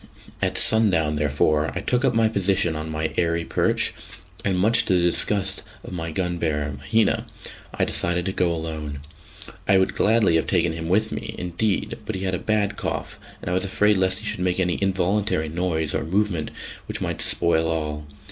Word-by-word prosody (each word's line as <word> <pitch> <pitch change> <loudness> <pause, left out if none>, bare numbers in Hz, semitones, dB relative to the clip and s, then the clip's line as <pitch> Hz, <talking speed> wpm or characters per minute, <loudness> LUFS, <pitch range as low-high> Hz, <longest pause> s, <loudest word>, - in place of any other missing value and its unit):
At - - 0
sundown, 90 -9 +4
therefore, 75 +1 +1
I - - -2
took 125 +1 0
up 130 -3 +2
my 115 -1 +4
position 100 -5 +1
on 80 +1 -4
my 80 0 -2
airy 85 -1 +1
perch, - - +1 0.5
and 95 -2 +1
much 115 +5 +4
to 95 - +2
the - - +4
disgust 95 +3 +1 0.2
of - - -8
my 85 -2 -3
gun 90 +1 -2
bearer, 75 -3 -1
Mahina, 75 +12 +1 0.4
I - - 0
decided 85 0 0
to 95 - 0
go 90 -2 +1
alone. 80 -3 -4 0.7
I 95 - +5
would 95 - +2
gladly 105 -6 +3
have 80 - -1
taken 85 -3 +2
him 80 0 -5
with 110 +4 +2
me, 110 0 -5
indeed, 100 +4 -1
but 110 - -2
he 95 - -4
had 95 -1 -1
a 90 - -1
bad 105 -2 0
cough, - - -4 0.2
and - - -3
I - - 0
was 95 - +1
afraid 105 +2 +3
lest 95 +1 +2
he - - -9
should - - -3
make 90 0 0
any 90 -1 0
involuntary 95 -3 +1
noise 80 -2 -1
or - - -1
movement 90 -1 0 0.4
which - - -4
might - - -2
spoil 80 -1 +2
all. 75 -2 -2
90 Hz, 195 wpm, -23 LUFS, 80-100 Hz, 0.7 s, I